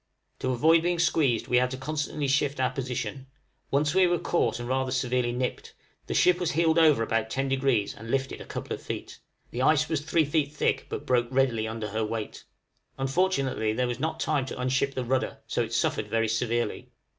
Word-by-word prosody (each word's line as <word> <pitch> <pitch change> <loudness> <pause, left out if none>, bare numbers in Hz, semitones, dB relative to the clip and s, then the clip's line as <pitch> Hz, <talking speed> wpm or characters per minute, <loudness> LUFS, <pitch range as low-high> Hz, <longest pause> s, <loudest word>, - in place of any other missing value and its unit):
To 130 - -2
avoid 160 +6 +4
being 175 +1 0
squeezed 150 -8 +2
we 125 - +3
had 125 +1 +1
constantly 150 +1 -3
to 135 - +2
shift 140 0 +1
our 130 -1 +2
position; 130 +1 -4 0.4
once 145 +1 +1
we 190 -1 +5
were 175 0 +2
caught 120 -10 0
and 120 - -5
rather 130 +1 0
severely 125 -1 0
nipped; 125 +1 -4 0.3
the - - -3
ship 180 -1 +4
was 175 -2 -1
heeled 165 +1 +3
over 150 -8 +5
about 115 0 -1
ten 135 +4 -1
degrees 130 -6 +1
and 115 +2 -10
lifted 135 +1 -1
a - - -8
couple - - -5
of - - -6
feet: - - -6 0.3
the 120 - -3
ice 155 +3 +3
was 155 -3 0
three 160 +1 +2
feet 145 -1 0
thick, 150 - 0
but - - -5
broke 120 -1 +2
readily 125 -4 +1
under 110 -1 -4
her 110 +2 -1
weight. 110 0 -5 0.5
Unfortunately 135 -6 0
there 125 +3 0
was 120 0 -3
not 160 +3 -2
time 145 -4 0
to - - -6
unship 130 +2 0
the 130 - -2
rudder, 130 +2 -1
so - - -1
it 115 -1 -3
suffered 110 -2 0
very 115 +1 +1
severely. 120 +1 -1
130 Hz, 205 wpm, -27 LUFS, 120-150 Hz, 0.5 s, we